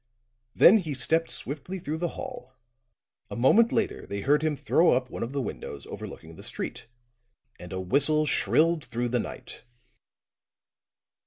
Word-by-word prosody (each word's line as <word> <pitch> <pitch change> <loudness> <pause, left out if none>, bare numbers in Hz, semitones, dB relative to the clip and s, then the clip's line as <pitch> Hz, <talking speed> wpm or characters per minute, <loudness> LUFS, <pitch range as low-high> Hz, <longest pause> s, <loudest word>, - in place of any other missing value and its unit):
Then 215 +5 +7
he 155 -7 -4
stepped 160 +6 +2
swiftly 155 +7 -6
through 160 -2 -4
the 175 - 0
hall; 130 +1 -8 0.7
a - - -6
moment 215 - +4
later 225 - -1
they 100 0 -4
heard 145 +7 +3
him 155 -1 0
throw 165 +4 +3
up 125 0 -1
one - - -6
of 115 - -3
the 140 -1 -2
windows 70 - -7
overlooking 80 +1 -9
the - - -10
street, - - -5 0.7
and 90 - -10
a 95 - -3
whistle 140 +11 +2
shrilled 160 +2 +2
through 120 0 -3
the 125 +1 0
night. - - -7
140 Hz, 155 wpm, -27 LUFS, 120-160 Hz, 0.7 s, Then